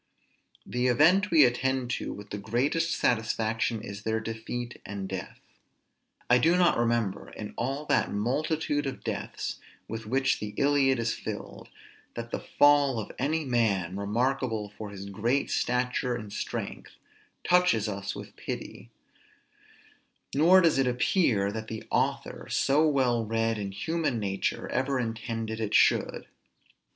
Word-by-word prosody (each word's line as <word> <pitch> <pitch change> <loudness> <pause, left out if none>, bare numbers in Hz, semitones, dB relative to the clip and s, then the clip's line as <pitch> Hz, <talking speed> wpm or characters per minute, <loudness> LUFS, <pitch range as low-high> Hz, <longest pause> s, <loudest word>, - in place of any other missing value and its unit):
The 125 +1 0
event 170 - +4
we 155 -4 +7
attend 125 0 0
to - - -3
with 105 0 -9
the 105 - -4
greatest 135 +11 0
satisfaction 110 -1 0
is 100 -2 -7
their 110 +1 -1
defeat 115 +2 -5
and 100 -2 -5
death. 95 -1 -6 0.9
I 125 - +5
do 165 +7 +4
not 180 -1 +4
remember, 115 -4 0
in 105 - -8
all 135 +5 -2
that - - +1
multitude 145 +6 0
of 135 - -6
deaths - - -4 0.3
with 110 0 -6
which 135 +3 +1
the 105 0 -6
Iliad 140 -2 +3
is 115 0 0
filled, - - -7 0.5
that 115 0 -6
the - - -2
fall 145 -3 +4
of 110 - -4
any 155 +4 0
man, 100 -8 +1
remarkable 115 +1 -1
for 105 -2 -7
his 100 -1 -8
great 115 +8 0
stature 125 0 0
and 105 -3 -7
strength, - - -5 0.5
touches 180 - +3
us 100 -1 -4
with - - -9
pity; - - -7 1.4
nor 170 +6 +6
does 165 -5 +3
it 135 - +3
appear 120 - +2
that 110 +1 -5
the 110 0 -6
author, - - -1
so 150 +3 +3
well 130 -5 +2
read 115 0 0
in 100 -1 -4
human 160 +5 -1
nature, 100 -3 -2
ever 135 0 0
intended 115 -1 -3
it 110 -2 -1
should. - - +3
120 Hz, 140 wpm, -28 LUFS, 110-135 Hz, 1.4 s, we